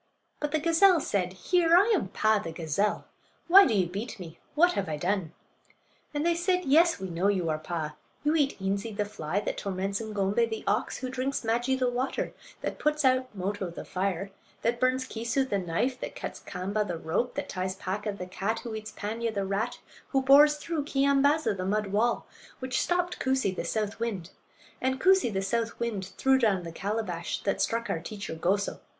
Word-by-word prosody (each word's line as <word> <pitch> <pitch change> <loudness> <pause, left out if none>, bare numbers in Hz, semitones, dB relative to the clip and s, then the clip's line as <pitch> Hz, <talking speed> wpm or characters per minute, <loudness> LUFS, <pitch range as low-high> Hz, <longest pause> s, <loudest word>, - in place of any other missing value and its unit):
But 295 -1 -2
the 315 - +2
gazelle 335 +3 +5
said: 185 -9 -1
"Here! 335 - +3
I 405 +5 +5
am 360 - +1
Paa, 215 +2 +2
the 165 - -5
gazelle. 165 +6 -1 0.4
Why 390 +3 +9
do 225 - +1
you 190 -3 +3
beat 200 +6 -5
me? 170 -3 -9 0.2
What 350 +4 +5
have 260 - -2
I 155 - -2
done?" 180 0 -1 0.8
And 295 +1 -2
they 340 - +4
said: 360 +2 0
"Yes, 330 +3 +4
we 190 - -4
know 175 +2 0
you 185 -5 +1
are 155 - -2
Paa; 155 -1 -4 0.3
you 300 +1 +2
eat 290 -7 +1
Eenzee, 200 +2 -2
the 210 - +1
fly; 200 -2 -3
that - - -3
torments 195 +1 -2
Ng'ombay, 210 +1 +1
the 220 -1 -4
ox; 205 +2 0
who 255 - -4
drinks 265 +1 -2
Maajee, 240 +4 +1
the 255 -1 +1
water; 250 +2 -2 0.3
that - - -4
puts 300 -1 +1
out 255 0 +3
Moto, 195 0 -3
the 170 - -8
fire; 195 0 -2 0.3
that 235 +1 +1
burns 255 +1 +2
Keesoo, 235 +4 -1
the 200 -5 0
knife; 190 +9 -1
that - - -6
cuts - - -6
Kaamba, 195 +4 -2
the 175 -5 -4
rope; 165 +10 -1
that - - -3
ties 185 0 -3
Paaka, 200 +3 -3
the 195 -2 -6
cat; 195 +5 -2
who 235 -3 -6
eats 220 0 -6
Paanya, 225 +3 -3
the 200 -2 -2
rat; 205 +5 -1 0.3
who 270 -1 +1
bores 290 +3 +7
through 305 0 -3
Keeyambaaza, 280 -1 +3
the 185 - -4
mud 210 +3 0
wall; 230 +4 +1 0.3
which 260 0 -1
stopped 355 0 0
Koosee, 260 -8 +1
the - - -3
south 210 -2 -2
wind; 200 -7 -3 0.5
and 260 +1 0
Koosee, 380 -6 +4
the 195 -1 -1
south 230 +3 -1
wind, 215 -5 -2
threw 265 0 +4
down 200 -7 +2
the 165 - -6
calabash 190 -2 -3
that 195 - 0
struck 230 +1 0
our 195 - -1
teacher 200 +2 -6
Goso. 190 +5 0
220 Hz, 200 wpm, -28 LUFS, 190-265 Hz, 0.8 s, Why